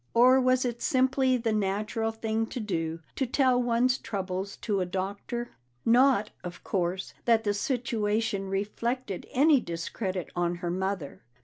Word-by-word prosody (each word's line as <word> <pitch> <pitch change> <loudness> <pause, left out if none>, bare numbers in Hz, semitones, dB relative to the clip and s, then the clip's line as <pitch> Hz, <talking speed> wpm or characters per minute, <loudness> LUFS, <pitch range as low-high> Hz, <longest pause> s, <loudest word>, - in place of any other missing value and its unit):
Or 255 +3 +6
was 255 0 +3
it 240 -1 -3
simply 260 0 +2
the 230 -2 -1
natural 215 +2 0
thing 225 0 -2
to 250 - -5
do 165 -6 -2
to 265 - 0
tell 255 0 +3
one's 245 +2 +2
troubles 195 -2 -4
to 205 -4 0
a - - +1
doctor? 200 +6 -4 0.3
Not, 240 -2 +4
of 180 0 -8
course, 185 0 -2
that 230 -2 +4
the 205 -1 +1
situation 215 -4 -1
reflected 210 +2 -2
any 290 +2 +5
discredit 185 0 -4
on 175 0 0
her 175 0 -3
mother. 190 -4 -3
Mrs. 120 - -41
220 Hz, 150 wpm, -28 LUFS, 190-245 Hz, 0.3 s, Or